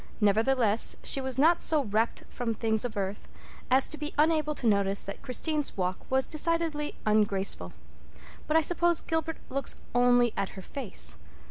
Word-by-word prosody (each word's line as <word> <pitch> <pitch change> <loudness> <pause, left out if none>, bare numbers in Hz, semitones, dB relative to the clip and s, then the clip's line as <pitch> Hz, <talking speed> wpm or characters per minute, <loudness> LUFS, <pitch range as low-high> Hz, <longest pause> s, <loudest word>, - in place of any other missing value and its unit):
Nevertheless, 220 +1 +3
she 270 - +2
was 260 -1 -4
not 325 +5 +4
so 310 -3 +1
rapt 220 0 -1
from 235 -2 -3
things 220 -1 0
of 235 -3 -5
earth 195 +1 -4 0.4
as 260 +1 +4
to 305 - -6
be 300 0 -5
unable 305 0 +2
to 250 - -5
notice 200 -2 +2
that 200 - -7
Christine's 295 +2 -2
walk 185 0 -1
was 265 0 +2
decidedly 315 -1 -1
ungraceful. 200 - +1 0.8
"But 305 - +3
I - - +5
suppose 345 +1 +2
Gilbert 325 0 -2
looks 275 0 -1 0.2
only 245 -1 +4
at 195 0 -3
her 190 - -8
face. 210 - -3
250 Hz, 160 wpm, -28 LUFS, 210-300 Hz, 0.8 s, I